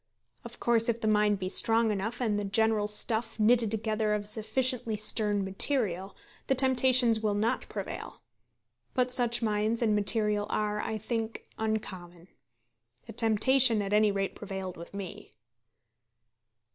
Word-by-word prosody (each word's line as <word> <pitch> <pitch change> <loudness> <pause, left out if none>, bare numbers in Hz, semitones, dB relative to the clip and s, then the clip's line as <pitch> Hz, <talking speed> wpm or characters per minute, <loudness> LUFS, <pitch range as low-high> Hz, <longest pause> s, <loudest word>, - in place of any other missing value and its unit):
Of - - -11
course 235 -1 +1
if 235 0 -1
the 220 - -3
mind 210 -1 +2
be 185 -1 -5
strong 225 +3 +3
enough, 210 +4 -4
and 210 -4 0
the - - -3
general 215 +1 +1
stuff 220 +2 +1
knitted 225 +1 +3
together 215 0 -1
of 205 -1 -4
sufficiently 225 +2 -1
stern 210 -1 0
material, 195 -2 -2 0.3
the 270 - +2
temptations 255 -3 +3
will 215 -2 -1
not 225 +5 -2
prevail. 200 -2 -7 0.8
But 250 -1 0
such 240 -1 +2
minds 215 +2 0
and 220 - +1
such - - +2
material 210 0 +1
are, 210 0 -2
I 220 - -4
think, 225 +1 -4 0.2
uncommon. 185 -5 -5 0.8
The - - -10
temptation 230 +2 +4
at 200 +1 -4
any 210 0 +3
rate 195 -1 -3
prevailed 190 -2 -7
with 170 +4 -11
me. 195 -3 -8
215 Hz, 145 wpm, -28 LUFS, 205-230 Hz, 0.8 s, temptation